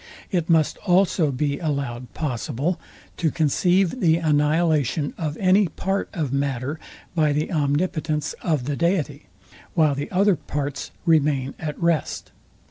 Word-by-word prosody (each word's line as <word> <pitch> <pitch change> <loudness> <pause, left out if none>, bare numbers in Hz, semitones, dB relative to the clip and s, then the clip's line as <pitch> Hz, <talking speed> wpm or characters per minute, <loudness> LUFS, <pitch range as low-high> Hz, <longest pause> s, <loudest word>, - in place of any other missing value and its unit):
It 175 -4 0
must 160 -2 +3
also 180 -4 +2
be 140 +2 -1
allowed 140 -6 -3
possible, 150 +4 -2 0.4
to 165 - +1
conceive 175 - +2
the 165 -6 +4
annihilation 150 -2 +1
of 155 -3 -3
any 190 +1 +4
part 195 +5 -2
of 150 -7 -2
matter 140 +1 -1 0.3
by 155 -4 +2
the 150 +4 -1
omnipotence 155 0 0
of 155 -7 0
the 145 +1 -1
deity, 160 -4 -1 0.5
while 155 -4 +4
the 140 +1 -4
other 200 +1 +3
parts 145 -3 -4 0.2
remain 145 -4 +2
at 150 -2 -5
rest. 170 -2 -1
155 Hz, 130 wpm, -23 LUFS, 145-170 Hz, 0.5 s, the